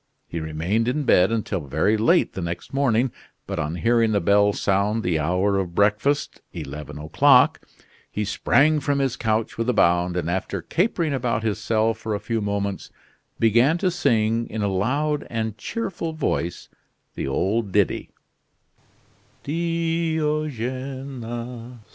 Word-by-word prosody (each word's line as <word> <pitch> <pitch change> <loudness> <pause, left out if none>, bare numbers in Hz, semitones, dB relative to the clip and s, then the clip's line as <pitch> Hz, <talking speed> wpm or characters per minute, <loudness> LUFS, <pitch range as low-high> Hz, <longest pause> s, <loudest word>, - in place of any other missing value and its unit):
He 85 - -4
remained 80 +9 -1
in 145 +4 0
bed 95 -6 +4
until 110 -4 -1
very 80 +10 +2
late 115 +12 +3
the 95 - -5
next 85 +9 -5
morning; 130 -3 +2 0.3
but - - -4
on 75 +3 -2
hearing 115 +2 +2
the 100 - +3
bell 100 +3 +4
sound 100 +3 0
the 85 -3 +1
hour 90 +5 +1
of 90 -3 -4
breakfast, 105 +8 +1
eleven 75 +2 -7
o'clock, 75 +1 +4 0.5
he 105 - -3
sprang 150 +8 +3
from 145 0 0
his 135 -3 0
couch 110 0 -1
with 115 +2 0
a - - +3
bound, 90 +1 +3
and 85 - -2
after 95 +2 -2
capering 170 - 0
about 120 -4 -1
his 110 -1 -1
cell 110 0 +1
for 110 -1 -4
a - - -3
few 115 +1 -2
moments, 100 -1 -3 0.5
began 120 +8 +4
to 185 0 +1
sing, 115 -8 +1
in 110 -1 -3
a - - +1
loud 145 +10 0
and 110 -2 -2
cheerful 175 -7 -4
voice, 85 - -2 0.5
the - - -4
old 100 +9 0
ditty: 100 -1 +1 1.3
"Diogene! 140 -7 -3
115 Hz, 145 wpm, -23 LUFS, 100-135 Hz, 1.3 s, bed